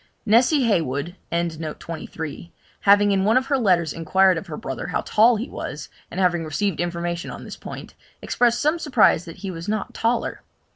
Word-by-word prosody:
Nessy 245 +6 +4
Heywood 165 - 0 0.2
having 170 +4 -1
in 195 -1 +2
one 220 +5 +4
of 260 - +1
her 275 0 +1
letters 175 - +2
inquired 185 +3 +3
of 195 - -12
her 155 -3 -6
brother 135 - -5
how - - -1
tall 230 +3 +4
he 225 +5 -3
was, - - -7 0.2
and - - -5
having 175 -3 +2
received 165 +3 -2
information 170 0 -3
on - - -8
this - - -8
point, - - -9 0.3
expressed 240 -1 +1
some 305 +3 +1
surprise 250 - +3
that 165 - -10
he 190 - -3
was 170 +1 -7
not 215 0 -2
taller. 230 +1 -1
190 Hz, 175 wpm, -23 LUFS, 165-225 Hz, 0.3 s, Nessy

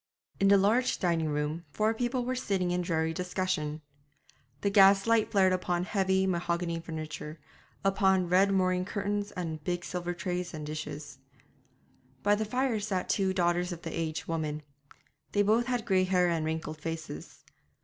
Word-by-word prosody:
In 195 - +4
the 200 0 +7
large 220 +6 +2
dining 165 -4 0
room 150 +3 -2
four 215 +8 +1
people 245 +2 -1
were 255 - -1
sitting 195 -8 -1
in 180 0 0
dreary 160 -2 0
discussion. 180 -4 -2 0.8
The 200 - +1
gas 195 -1 +6
light 230 -1 +3
flared 190 -4 +4
upon 180 -1 0
heavy 190 0 +1
mahogany 170 -2 -1
furniture, 155 -1 -6 0.5
upon 190 -2 +3
red 190 +3 +4
moreen 185 -1 +2
curtains 205 +1 -2
and 160 -4 -4
big 175 +1 -2
silver 175 -1 -3
trays 180 -1 -3
and 155 -1 -6
dishes. 150 -2 -6 1.0
By 205 - +4
the 215 +1 0
fire 250 0 0
sat 195 -3 -2
the - - +4
two 190 -2 +1
daughters 175 0 +1
of 170 -1 -7
the 165 - -5
aged 160 -1 -3
woman. 155 -2 -3 0.7
They 205 - +4
both 225 +4 +2
had 245 -3 -1
grey 190 -4 +3
hair 180 -1 +3
and 165 -2 0
wrinkled 155 -1 -4
faces. 160 - -6
180 Hz, 165 wpm, -30 LUFS, 165-200 Hz, 1.0 s, the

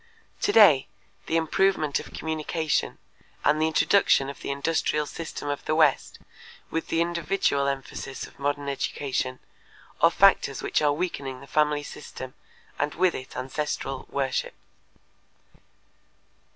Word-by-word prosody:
Today, 190 -12 +6 0.4
the 165 - +1
improvement 160 -2 +1
of - - -10
communication 160 0 -2 0.5
and 150 +1 +3
the 160 - +3
introduction 160 -4 +3
of 140 - -14
the - - -6
industrial 150 +1 0
system 160 -1 -6
of 145 -1 -3
the 155 - +1
West 155 -4 +2 0.5
with 165 - -2
the 165 - +1
individual 170 -4 0
emphasis 135 0 -4
of - - -17
modern 145 0 -1
education 135 -2 -2 0.6
are - - +7
factors - - +3
which - - +1
are 150 -1 +3
weakening 145 -5 -3
the 140 - -12
family 150 0 +1
system 130 -2 -9 0.5
and 145 +1 -1
with 185 0 +3
it 130 - -8
ancestral 135 0 -3
worship. 135 -2 -2
150 Hz, 125 wpm, -26 LUFS, 140-160 Hz, 0.6 s, are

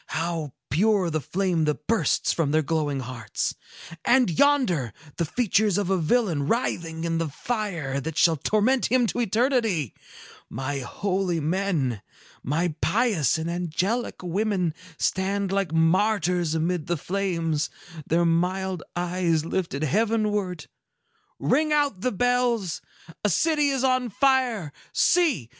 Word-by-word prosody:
How 165 -4 -3 0.2
pure 190 - +2
the 155 0 -1
flame 180 -1 0
that 150 -1 -2
bursts 225 0 +1
from 165 -4 0
their 155 +1 +2
glowing 145 -2 -1
hearts! 120 -3 -3 0.5
And 250 -6 +4
yonder 180 - +2 0.2
the 170 - 0
features 210 0 +1
of 200 -2 0
a 190 - +3
villain 165 - +1
writhing 165 -8 -1
in 165 -1 0
the 165 - -1
fire 170 - -3
that 160 +2 -5
shall 165 -2 +5
torment 215 - +1
him 250 0 +3
to 230 - -2
eternity. 225 - +1 0.6
My 135 +1 -3
holy 185 +5 -1
men, 155 - -1 0.4
my 160 +5 -1
pious 200 - +2
and 160 +1 -3
angelic 180 +7 -2
women, 185 -2 0 0.2
stand 195 +1 0
like 195 -4 0
martyrs 175 0 +2
amid 165 0 -1
the 175 - 0
flames, 165 -3 -1 0.4
their 170 +2 +2
mild 180 +2 0
eyes 175 -2 0
lifted 165 -4 -2
heavenward. 210 - 0 0.7
Ring 305 0 +1
out 285 -10 +1
the 255 - 0
bells! 240 -4 0 0.4
A 210 - +3
city 295 - +2
is 270 -2 -1
on 255 -2 +2
fire. 245 - +1 0.2
See! 300 - +2
180 Hz, 130 wpm, -25 LUFS, 160-220 Hz, 0.7 s, shall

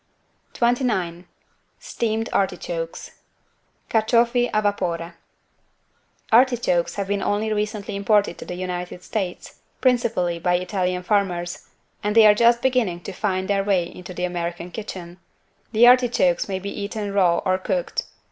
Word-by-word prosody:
29 215 -8 0 0.5
STEAMED 225 - -2
ARTICHOKES - - -2 0.8
(Carciofi 235 +2 +2
a 215 - +2
vapore) 175 -4 -1 1.2
Artichokes 235 -8 +3
have 200 -1 -3
been 200 0 -1
only 215 +1 0
recently 210 -1 -3
imported 205 +1 +2
to - - -6
the 180 - -6
United 180 0 -5
States, 190 -5 -5 0.2
principally 230 -9 +1
by 180 +1 +1
Italian 180 0 -1
farmers, 180 -3 -1 0.3
and 210 +1 -1
they 225 -1 +8
are 210 - +8
just 235 +2 +3
beginning 245 -10 +1
to 195 - -7
find 190 -1 -1
their 200 -1 +1
way 195 -3 +2
into 175 +1 -10
the 180 0 -5
American 175 0 -4
kitchen. 185 -4 -8 0.5
The 230 +1 +5
artichokes 245 -9 +4
may 190 - -1
be 200 +2 -5
eaten 205 0 -4
raw 180 -4 +3
or 185 0 +2
cooked. 185 -2 -2
200 Hz, 135 wpm, -23 LUFS, 180-225 Hz, 1.2 s, they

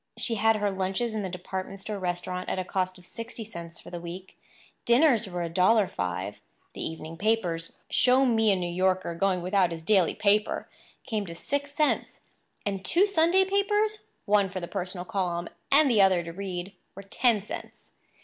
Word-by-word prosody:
She 235 - +1
had 225 +1 +3
her 205 -1 0
lunches 195 +5 -1
in 215 - -2
the 190 - -3
department 190 +2 -5
store 205 +1 -5
restaurant 180 0 -3
at - - -1
a 185 - -2
cost 185 0 -2
of 180 - -16
sixty 230 +3 -7
cents 170 -5 -9
for - - -12
the 175 - -5
week; 180 +2 -8 0.5
dinners 235 -2 +4
were 175 -2 -3
$1.05. 180 - +1 0.3
The - - -5
evening 160 0 -6
papers—show 215 +6 +1
me 225 -3 +4
a - - +4
New 180 -1 -2
Yorker 185 0 0
going 180 +1 0
without 185 -1 +2
his 165 -1 -6
daily 190 -2 +3
paper!—came 210 0 -1
to 170 - -7
six 285 +9 -3
cents; 300 0 0 0.4
and 195 -2 -2
two 350 - +4
Sunday 375 0 +3
papers—one 400 - +1
for 185 - -4
the 175 - -6
personal 180 -1 -4
column 180 -5 -2 0.2
and 290 +2 +6
the 230 -6 +4
other 185 -3 +4
to 165 0 -7
read—were 190 +1 -7
ten 215 +1 +1
cents. - - -9
195 Hz, 170 wpm, -27 LUFS, 180-225 Hz, 0.5 s, and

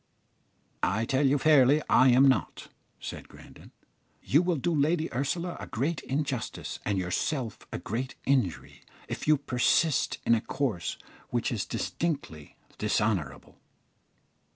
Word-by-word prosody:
"I 110 +5 +1
tell 135 +3 +2
you 140 +2 +3
fairly 145 -1 +5
I 130 - +5
am 130 +3 +6
not," 130 - 0 0.3
said - - -7
Grandon. - - -15 0.5
"You 150 +6 +4
will 180 -1 +1
do 165 +4 -1
Lady 155 +2 +1
Ursula 170 +7 -2
a - - -7
great 145 +7 -2
injustice, 135 -4 -3
and 100 -2 -1
yourself 110 - -2
a - - -3
great 125 +5 -4
injury, 125 - 0 0.3
if - - -5
you 155 0 +5
persist 135 +3 +1
in - - +4
a 115 - +2
course 115 -14 -2 0.3
which - - -1
is - - -2
distinctly 135 - -4 0.2
dishonourable." 105 -7 -1
130 Hz, 130 wpm, -28 LUFS, 110-150 Hz, 0.5 s, am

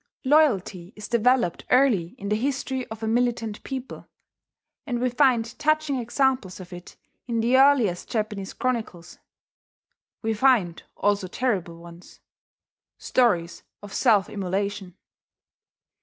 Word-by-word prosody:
Loyalty 210 - +2
is 210 - -8
developed 235 -4 +1
early 240 -10 +3
in 200 - -6
the 210 - +2
history 265 +1 -2
of 220 0 -9
a - - -1
militant 230 -2 -1
people; 265 -1 -7 0.8
and 245 -3 -1
we 250 0 0
find 245 -3 +2
touching 310 -2 +1
examples 250 -5 0
of 185 0 -10
it 175 0 -11 0.3
in 230 -2 -1
the 235 +3 +2
earliest 260 -10 +3
Japanese 210 -4 -3
chronicles. 220 -9 -4 1.0
We 225 0 0
find 215 -7 +2 0.2
also 200 -2 0
terrible 185 -6 -2
ones, 170 +1 -14 0.8
stories 180 -10 +1 0.2
of 205 - -10
self 215 -7 +3
immolation. 195 -1 -4
225 Hz, 120 wpm, -24 LUFS, 190-255 Hz, 1.0 s, early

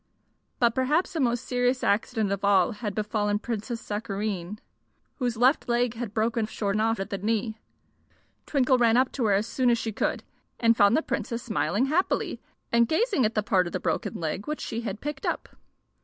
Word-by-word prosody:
But 235 -2 +3
perhaps 290 +8 +1
the 325 - -2
most 245 -2 +1
serious 250 +1 0
accident 215 0 +1
of 200 0 -2
all 200 -2 +4
had 210 -2 -5
befallen 210 -1 0
Princess 230 +2 -4
Sakareen, 205 -3 -4 0.6
whose 245 -4 -1
left 255 +2 +3
leg 240 0 +2
had 235 -3 -5
broken 225 0 +1
short 205 -1 -2
off 225 -1 +1
at 195 +3 -4
the 200 - -2
knee. 220 +1 -1 0.9
Twinkle 260 -3 +3
ran 235 -1 +4
up 255 0 +3
to 250 - -1
her 205 - +3
as 200 +2 +2
soon 255 +1 +1
as 235 - +4
she 225 -1 -3
could, 210 - -1 0.4
and 230 -1 +4
found 205 +3 +5
the 320 - 0
Princess 235 -1 -3
smiling 215 +1 0
happily 320 +7 0 0.3
and 235 0 +4
gazing 385 - +2
at 220 - -7
the 215 - +1
part 190 -5 +2
of - - -8
the - - -1
broken - - -2
leg 165 +4 -3
which 300 0 -3
she 230 +1 -3
had 210 -2 -5
picked 295 -1 -5
up. - - -2
230 Hz, 195 wpm, -26 LUFS, 205-245 Hz, 0.9 s, found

